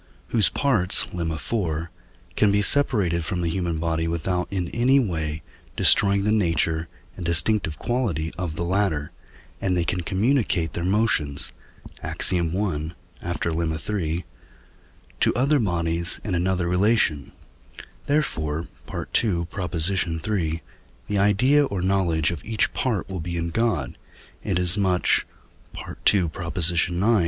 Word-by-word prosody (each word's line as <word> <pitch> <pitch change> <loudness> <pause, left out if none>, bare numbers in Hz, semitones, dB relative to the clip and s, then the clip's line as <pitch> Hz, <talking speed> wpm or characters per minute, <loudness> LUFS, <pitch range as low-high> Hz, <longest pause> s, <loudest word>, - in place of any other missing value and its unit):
whose 110 -4 +3
parts 115 -11 +3
(Lemma 85 -3 -2
iv.) 85 -2 -2 0.5
can 105 -2 +3
be 100 0 +2
separated 100 - +1
from 90 0 -3
the 85 -1 -1
human 85 -2 -2
body 80 0 -1
without 90 +2 -1
in 90 -3 -2
any 125 +4 +3
way 80 - -2 0.3
destroying 100 0 +5
the 105 - +1
nature 85 -5 +1 0.3
and - - -7
distinctive 85 0 +2
quality 100 - -2
of 90 -4 -4
the 85 - -3
latter, 85 -5 0 0.5
and 90 -2 0
they 85 - +1
can 90 +3 -1
communicate 100 - 0
their 85 - -3
motions 90 -8 +1 0.5
(Ax. - - -1
i., - - +3 0.8
after 85 -1 -2
Lemma 80 -1 -1 0.2
iii.) 85 -3 -2 0.9
to - - +2
other 140 +4 +3
bodies 85 -4 0
in 105 - -3
another 90 0 0
relation; 90 -5 +1 0.8
therefore 80 - -1 0.2
(II. 90 -7 0
iii.) 85 -2 -1 0.4
the 105 -1 -1
idea 125 +9 +4
or 100 -8 -3
knowledge 85 -5 +1
of 85 - -6
each 110 0 0
part 115 -8 -1
will 95 -2 -5
be 85 +1 -4
in 85 0 -2
God, 90 - -1 0.4
inasmuch 90 0 +2 0.8
(II. 100 -3 +2
ix.) 85 0 +1
90 Hz, 130 wpm, -24 LUFS, 85-105 Hz, 0.9 s, destroying